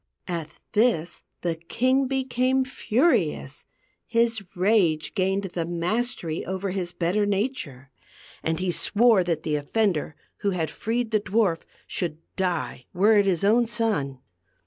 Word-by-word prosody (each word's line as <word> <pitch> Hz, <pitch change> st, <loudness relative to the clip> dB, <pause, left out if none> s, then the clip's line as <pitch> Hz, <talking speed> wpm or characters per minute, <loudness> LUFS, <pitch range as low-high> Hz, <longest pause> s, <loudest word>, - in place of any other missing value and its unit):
At 165 Hz, -4 st, -5 dB
this 205 Hz, -7 st, +1 dB, 0.2 s
the 170 Hz, -1 st, 0 dB
king 255 Hz, +11 st, +1 dB
became 260 Hz, 0 st, +1 dB
furious; 260 Hz, +4 st, 0 dB, 0.4 s
his 230 Hz, -2 st, +1 dB
rage 180 Hz, -5 st, +2 dB
gained 195 Hz, 0 st, +1 dB
^ 190 Hz, -, -5 dB
the 170 Hz, -2 st, -2 dB
mastery 175 Hz, 0 st, -2 dB
over 190 Hz, +1 st, -3 dB
his 180 Hz, -2 st, -3 dB
better 180 Hz, +4 st, 0 dB
nature, 195 Hz, -, -2 dB, 0.5 s
and 160 Hz, +1 st, -1 dB
he 185 Hz, -1 st, 0 dB
swore 215 Hz, +2 st, +4 dB
that 165 Hz, -3 st, -1 dB
the 155 Hz, -2 st, 0 dB
offender 160 Hz, -1 st, 0 dB, 0.2 s
who 200 Hz, -, 0 dB
had 175 Hz, -5 st, -1 dB
freed 230 Hz, +1 st, -2 dB
the 215 Hz, -1 st, +2 dB
dwarf 195 Hz, -4 st, +1 dB, 0.2 s
should,, 165 Hz, -4 st, -2 dB
„ -, -, -51 dB
die, 175 Hz, -9 st, -2 dB
w 195 Hz, +4 st, +4 dB
r -, -, +7 dB
ere 210 Hz, -, +6 dB
it 200 Hz, -, +3 dB
his 180 Hz, -3 st, +1 dB
own 230 Hz, +4 st, +4 dB
son. 210 Hz, -, -1 dB
195 Hz, 150 wpm, -25 LUFS, 170-225 Hz, 0.5 s, r